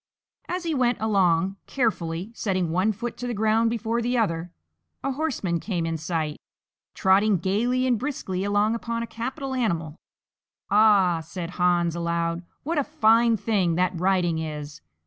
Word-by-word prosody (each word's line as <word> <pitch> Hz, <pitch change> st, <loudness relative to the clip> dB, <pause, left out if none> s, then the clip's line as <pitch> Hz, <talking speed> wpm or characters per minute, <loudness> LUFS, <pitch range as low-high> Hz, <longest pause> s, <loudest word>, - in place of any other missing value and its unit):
As 360 Hz, 0 st, -3 dB
he 330 Hz, -2 st, -1 dB
went 250 Hz, -3 st, +1 dB
along, 195 Hz, -3 st, +2 dB
carefully 190 Hz, -6 st, -1 dB
setting 185 Hz, -7 st, -1 dB
one 185 Hz, +6 st, +2 dB
foot 230 Hz, +3 st, -5 dB
to 245 Hz, -, -4 dB
the 240 Hz, -, -2 dB
ground 220 Hz, +2 st, +2 dB
before 230 Hz, +1 st, -1 dB
the 245 Hz, +1 st, 0 dB
other, 170 Hz, -6 st, -1 dB, 0.5 s
a 275 Hz, -, 0 dB
horseman 255 Hz, -, -1 dB
came 175 Hz, -3 st, -2 dB
in 165 Hz, 0 st, -2 dB
sight, 155 Hz, -1 st, -3 dB, 0.5 s
trotting 195 Hz, +2 st, +4 dB
gaily 235 Hz, +8 st, 0 dB
and 245 Hz, -4 st, +2 dB
briskly 250 Hz, -9 st, -3 dB
along 205 Hz, +2 st, +2 dB
upon 230 Hz, 0 st, -3 dB
a -, -, -3 dB
capital 260 Hz, +4 st, -5 dB
animal. 170 Hz, -, -1 dB, 0.8 s
"Ah," 200 Hz, -5 st, +5 dB
said 170 Hz, +2 st, -6 dB
Hans, 175 Hz, -2 st, +2 dB
aloud, 170 Hz, 0 st, -1 dB, 0.2 s
"what 320 Hz, +1 st, 0 dB
a -, -, +2 dB
fine 230 Hz, -6 st, +3 dB
thing 190 Hz, -6 st, +1 dB
that 185 Hz, +1 st, +1 dB
riding 180 Hz, -2 st, +1 dB
is! 150 Hz, -1 st, -6 dB
200 Hz, 155 wpm, -25 LUFS, 170-235 Hz, 0.8 s, Ah